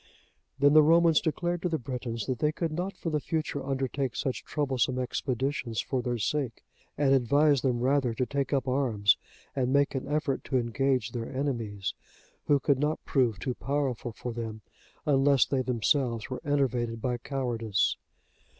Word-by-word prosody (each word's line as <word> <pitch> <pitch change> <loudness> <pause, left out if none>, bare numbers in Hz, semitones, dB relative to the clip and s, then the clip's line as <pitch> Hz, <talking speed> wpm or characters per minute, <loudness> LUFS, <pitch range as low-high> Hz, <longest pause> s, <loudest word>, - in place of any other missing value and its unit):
Then 145 +1 +5
the 155 - +9
Romans 165 +1 +5
declared 175 +2 -1
to 180 - 0
the 160 - 0
Britons, 120 -3 -4
that 130 -3 -2
they 150 - +2
could 165 0 -2
not 180 +5 -3
for 165 - -3
the 150 - +1
future 155 -2 -2
undertake 135 -1 -2
such 130 - -2
troublesome 130 -4 0
expeditions 130 -2 -2
for 130 -2 -1
their 120 0 -2
sake, 120 +2 -2 0.3
and 140 -2 +3
advised 140 +2 +3
them 125 -3 +1
rather 130 -2 +2
to 125 - 0
take 140 0 -2
up 135 -2 0
arms 120 -7 +3 0.4
and 130 -2 0
make 140 +1 +3
an 135 0 -3
effort 145 -2 -1
to 130 - 0
engage 125 -1 0
their 115 -1 -5
enemies, 115 -8 -2 0.5
who 145 -1 +4
could 135 0 +2
not 150 +2 -1
prove 125 -7 +2
too 125 +7 -2
powerful 135 -3 -2
for 120 +2 -6
them, 110 -2 -5 0.4
unless 140 -2 +4
they 135 -2 0
themselves 120 0 0
were 130 - -4
enervated 125 -5 0
by 120 +1 -2
cowardice. 120 -6 0
130 Hz, 170 wpm, -28 LUFS, 120-145 Hz, 0.5 s, the